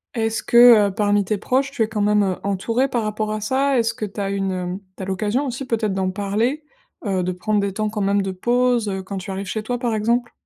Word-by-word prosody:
Est-ce 225 -1 -1
que, 235 -4 +7
heu, - - -5
parmi 205 -1 +1
tes 210 +2 -1
proches, 265 +4 0
tu 270 - -4
es - - -1
quand 215 -2 -2
même, 210 0 +3
heu, 185 -2 0
entouré 225 +7 0
par 240 -3 0
rapport 215 0 -2
à 215 0 -3
ça? 265 +4 +1
Est-ce 230 0 +1
que 215 - -3
tu 205 +1 -9
as 195 - -1
une 185 -1 -2 0.2
tu 190 - -6
as - - -4
l'occasion, 210 +8 -1
aussi, 255 +2 -4
peut-être, 220 -4 -1
d'en 190 -1 0
parler, 215 +9 -1 0.4
heu, 190 -2 0
de 185 - -1
prendre 205 +3 0
des 200 -1 -2
temps 215 +1 -1
quand 210 -1 -4
même 200 +1 +2
de 195 -1 -2
pause, 240 +3 +1
heu, 190 -1 -3
quand 195 +1 -6
tu 190 +1 -7
arrives 195 0 -5
chez 215 +2 -3
toi 245 +2 -3
par 235 -3 -1
exemple? 235 +3 0
215 Hz, 260 wpm, -21 LUFS, 195-235 Hz, 0.4 s, que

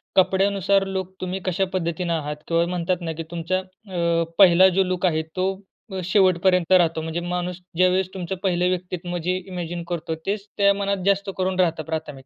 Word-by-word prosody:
कपड्यानुसार 195 +1 +3
लोक 190 -1 -4
तुम्ही 185 +1 -3
कशा 190 +1 +1
पद्धतीनं 170 -1 -1
आहात. 150 -2 -2
किंवा 165 0 +2
म्हणतात 180 0 -1
ना 165 -1 -3
की 165 - -3
तुमचा 175 +2 -1
अ, 180 -3 -2
पहिला 185 -1 +7
जो 195 - +5
लूक 185 0 -1
आहे 160 -3 +2
तो 185 +1 +1 0.6
शेवटपर्यंत 185 -1 +3
राहतो. 165 -3 +4
म्हणजे 160 +1 -3
माणूस 180 +1 -3 0.2
ज्यावेळेस 185 +1 +3
तुमचं 190 0 -4
पहिलं 180 -2 +2
व्यक्तित्व 180 -1 -3
जे 180 +1 0
इमॅजिन 175 -2 -5
करतो 165 -2 -3
तेच 200 +1 -2
त्या 200 0 +5
मनात 200 0 -1
जास्त 200 0 +2
करून 185 0 -1
राहतं 165 -3 +2
प्राथमिक. 155 -4 -5
180 Hz, 170 wpm, -23 LUFS, 170-190 Hz, 0.6 s, पहिला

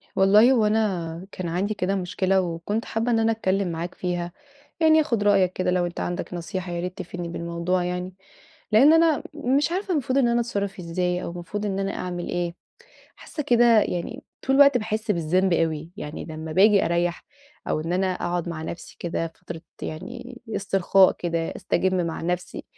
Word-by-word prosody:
والله 210 +6 +6
هوأنا 210 -8 +1
كان 185 - -5
عندي 185 +5 -1
كده 195 -1 -1
مشكلة، 190 +1 +1
وكنت 180 +6 -3
حابّة 230 +2 -1
إن 225 - +3
أنا 225 0 +3
أتكلّم 195 -3 0
معاك 170 +2 -5
فيها. 175 -1 -3 0.5
يعني 315 -1 +5
آخد 230 -8 0
رأيك 195 -3 +3
كده 185 0 0
لو 180 -1 +1
أنت 175 - -5
عندك 175 +1 -3
نصيحة 180 +1 -4
يا 170 - -3
ريت 180 +1 -5
تفيدني 175 -1 -6
بالموضوع 170 +2 -2
يعني. 180 +1 -3 0.6
لأن 270 +9 +7
أنا 325 -2 +4
مش 290 +2 +1
عارفة 380 +2 -2
المفروض 270 -3 0
إن 245 - +3
أنا 235 0 +2
أتصرّف 200 -5 -3
إزاي 180 +1 -1
أو - - -4
المفروض 175 +4 -5
إن 195 -1 -1
أنا 195 0 -2
أعمل 175 -1 -4
إيه؟ 175 -1 -2 0.6
حاسّة 300 - -6
كده 240 -4 +5
يعني 230 +10 -4 0.2
طول 270 +1 +3
الوقت 280 -2 +7
باحس 215 0 -3
بالذنب 180 +2 +2
أوي. 160 -1 0
يعني 150 -8 -6
لمّا 160 -1 -6
بآجي 200 +3 +5
أريح، 170 +1 0 0.4
أو - - 0
إن 165 +2 -3
أنا 190 +1 +1
أقعد 175 -1 -2
مع 160 -2 -5
نفسي 170 +2 -8
كده 165 -1 -3
فترة 165 - -9 0.2
يعني 245 +10 -7 0.2
استرخاء 195 -1 +4
كده 170 -1 -2 0.2
أستجم 185 -1 0
مع 165 - -4
نفسي 180 +1 -3
185 Hz, 175 wpm, -24 LUFS, 175-220 Hz, 0.6 s, لأن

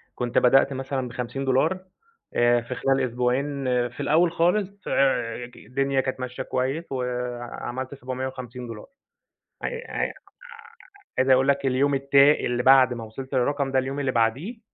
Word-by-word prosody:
كنت 120 -1 -2
بدأت 135 +2 +5
مثلًا 130 -1 -3
ب$50 135 +7 0 0.6
آآ 120 0 +4
في 120 +2 -6
خلال 135 +2 +1
أسبوعين 125 +4 -1 0.3
في 120 - -16
الأول 165 +3 +3
خالص 195 +4 0
آآ 120 -3 +1
ك 120 - -18
الدنيا 135 +1 -1
كانت 130 0 -4
ماشية 125 0 -5
كويس 135 +6 -2
وعملت 125 +1 -4
$750. 125 -3 -6 0.7
ع - - -2
ع 480 -1 -3 1.1
عايز 130 +1 +2
أقول 130 +1 +5
لك 140 0 +2
اليوم 135 +2 +2
التا 140 +1 +5
اللي 120 -4 -1
بعد 130 -1 +6
ما 120 -2 -6
وصلت 130 +5 -9
للرقم 140 +2 +1
ده، 130 - +3
اليوم 135 +2 -3
اللي 135 -2 0
بعديه، 130 - 0
130 Hz, 145 wpm, -25 LUFS, 125-140 Hz, 1.1 s, بعد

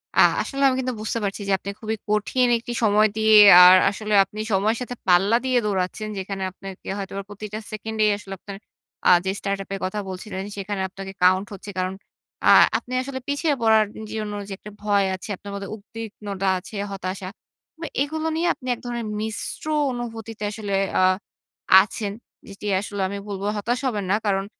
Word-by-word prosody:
আ - - +3 0.2
আসলে 275 0 -4
আমি 260 - +2
কিন্তু 255 -1 -2
বুঝতে 220 +2 -2
পারছি 200 +1 -3
যে 200 - 0
আপনি 195 - -7
খুবই 220 0 -3
কঠিন 210 +4 +2
একটি 240 +1 -7
সময় 215 0 +5
দিয়ে 220 0 +5 0.3
আর 180 +1 +10
আসলে 210 +2 -4
আপনি 210 +2 -10
সময়ের 215 +4 +2
সাথে 245 0 -5
পাল্লা 190 +5 +5
দিয়ে 255 -1 +2
দৌড়াচ্ছেন। 195 +2 -2
যেখানে 195 0 -4
আপনাকে 195 0 -11
হয়তোবা 195 0 -5
প্রতিটা 210 +1 -6
সেকেন্ডেই 215 0 0
আসলে 195 -2 -9
আপনার 200 +1 -9 0.5
আ - - +7 0.2
যে 190 - +1
startup 195 -1 -3
এর 195 - -6
কথা 210 +3 -3
বলছিলেন 190 +1 -6
সেখানে 195 0 -3
আপনাকে 195 0 -8
count 185 +2 +4
হচ্ছে। 200 +1 -9
কারণ, 185 +1 -1 0.5
আ - - +7 0.3
আপনি 250 - -8
আসলে 260 0 -5
পিছিয়ে 285 +2 +1
পড়ার 220 -1 +5 0.3
জন্য 215 -1 -3
যে 205 - -10
একটা 210 - -11
ভয় 205 -1 +3
আছে, 185 - -10
আপনার 200 +2 -10
মধ্যে 200 -1 -6
উদ্বিগ্নতা 210 -2 -6
আছে, 205 - -12 0.2
হতাশা। 185 -1 -5 0.5
আ - - -2 0.2
এগুলো 315 +2 -2
নিয়ে 335 +2 +1
আপনি 255 - -12
এক - - -17
ধরনের 235 -2 -3
মিশ্র 220 +7 -5 0.3
অনুভূতিতে 225 -3 -6
আসলে 205 -2 -5 0.3
আ - - +4 0.8
আছেন। 205 0 -4 0.3
যেটি 200 +1 -10 0.2
আসলে 205 -1 -5
আমি 200 - -5
বলবো 200 -1 -4
হতাশ 240 +4 -1
হবেন 210 -5 -2
না। 205 - +4
কারণ, 195 -1 +1
210 Hz, 180 wpm, -23 LUFS, 195-225 Hz, 0.8 s, আর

